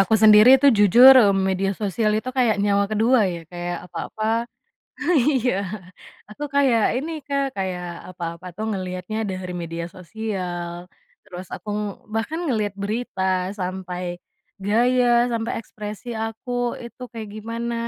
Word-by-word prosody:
aku 195 +3 +3
sendiri 215 +4 +9
tuh 280 - +7
jujur, 235 +6 +8
eee, 205 -5 +5
media 190 +1 0
sosial 210 +2 0
itu 235 +4 -2
kayak 230 -4 +3
nyawa 200 0 +2
kedua 225 +4 +3
ya, 170 - -6
kayak 175 0 -4
apa-apa 215 - -5 1.1
iya. 250 -3 0 0.8
Aku 295 +7 -6
kayak 255 -6 +3
ini 315 +5 -4
Kak 280 -1 0
kayak 185 -2 -3 0.3
apa-apa 170 0 -7
tuh 220 - -3
ngelihatnya 185 +1 -4
dari 185 -1 -5
media 165 0 -5
sosial, 180 -3 -5 0.3
terus 185 -2 -9
aku - - -10 0.5
bahkan 230 +9 -2
ngelihat 215 -7 -1
berita 210 -1 -3 0.4
sampai, 180 -1 -4 0.6
gaya 245 +4 +3 0.2
sampai 230 0 -2
ekspresi 215 +2 -8 0.2
aku 225 +2 -7 0.3
itu 235 +2 -11
kayak 225 -2 -7
gimana 230 +2 -4
210 Hz, 130 wpm, -23 LUFS, 185-235 Hz, 1.1 s, sendiri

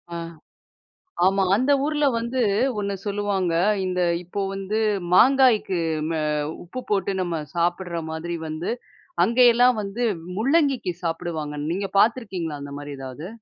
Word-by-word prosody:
ஆ. - - -3 1.1
ஆமா. 195 +1 +3
அந்த 260 +6 +2
ஊர்ல 300 0 +1
வந்து 235 +2 -1 0.4
ஒண்ணு 200 -1 -2
சொல்லுவாங்க, 200 -4 -1 0.3
இந்த 180 -1 -1 0.2
இப்போ 190 +3 -4
வந்து 195 +3 -2 0.3
மாங்காய்க்கு 240 -5 +5 0.3
ம - - -1 0.5
உப்பு 255 +9 -7
போட்டு 200 -1 +1
நம்ம 170 -3 -2
சாப்பிடுற 175 0 -1
மாதிரி 170 +2 -4
வந்து, 155 +2 -4 0.5
அங்கேயெல்லாம் 245 +2 +5
வந்து 205 +5 -4 0.3
முள்ளங்கிக்கு 270 - +2
சாப்பிடுவாங்க. 165 -3 -3 0.2
நீங்க 195 +2 -2
பார்த்துருக்கீங்களா 190 - 0
அந்தமாரி 145 0 -7
எதாவது? 135 +6 -7
195 Hz, 115 wpm, -24 LUFS, 170-235 Hz, 1.1 s, மாங்காய்க்கு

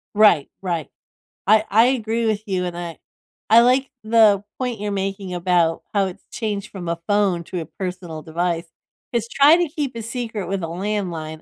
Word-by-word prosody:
Right, 205 -9 +5
right. 170 -5 -2 0.6
I 215 +1 +5
I 225 +4 +5
agree 230 -3 0
with 215 -1 0
you, 185 -2 -1
and 175 -1 -5
I 170 -2 -6 0.5
I 230 +2 +8
like 255 +2 +3
the 215 -3 +5 0.2
point 245 -4 -2
you're 205 0 -3
making 195 -1 -3
about 175 -2 +1
how 200 -1 +3
it's 185 -2 -7
changed 215 -2 -3
from 180 -4 -7
a 170 0 -2
phone 200 -4 +2
to 180 - -4
a 160 - -5
personal 180 -3 -6
device. 170 +1 -2 0.5
Just 235 0 -1
try 295 +4 +6
to 350 -2 +1
keep 285 -5 -3
a 230 - -4
secret 230 -4 -4
with 190 -1 -2
a - - -2
landline, 170 -4 -3
200 Hz, 185 wpm, -22 LUFS, 175-225 Hz, 0.6 s, I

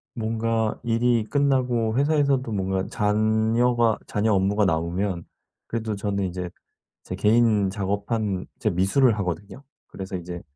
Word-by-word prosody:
뭔가 115 -1 -1
일이 120 0 +2
끝나고 125 -4 +1
회사에서도 140 -3 +2
뭔가 95 -2 -1
잔여가 110 +2 +2
잔여 105 +2 0
업무가 100 +2 +2
나오면 85 +2 -1 0.4
그래도 110 -2 -3
저는 100 -1 -2
이제 90 -1 -4 0.5
제 90 - -5
개인 105 0 +3
작업한 100 0 -2
제 110 - +1
미술을 105 +7 +3
하거든요. 95 - -4 0.3
그래서 95 0 -7
이제 85 0 -7
105 Hz, 290 characters per minute, -24 LUFS, 95-115 Hz, 0.5 s, 개인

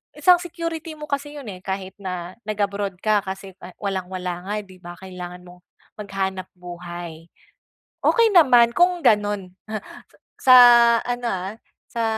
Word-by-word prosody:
isang 360 -1 +5
security 335 -2 -5
mo 300 - -11
kasi 290 +1 -3
'yun, 280 -4 -9
eh, 185 - -10
kahit 190 0 -5
na 180 -2 -5
nag-abroad 200 -2 -2
ka 215 -1 +3
kasi 190 0 -7 0.3
walang 190 -2 -2
wala 180 -1 -4
nga 205 - -2
di 185 -1 -17
ba, 175 0 -10
kailangan 180 -1 -9
mong 180 0 -15 0.4
maghanap 190 -2 -3
buhay, 175 -2 -9 0.8
okey 460 -2 +4
naman 250 -10 +6
kung 350 +4 +2
gano'n. 205 -3 +2 0.9
Sa 255 - +6 0.5
ano, 245 0 -2
ah, 190 0 -3 0.3
sa 230 - -3
195 Hz, 140 wpm, -22 LUFS, 180-245 Hz, 0.9 s, naman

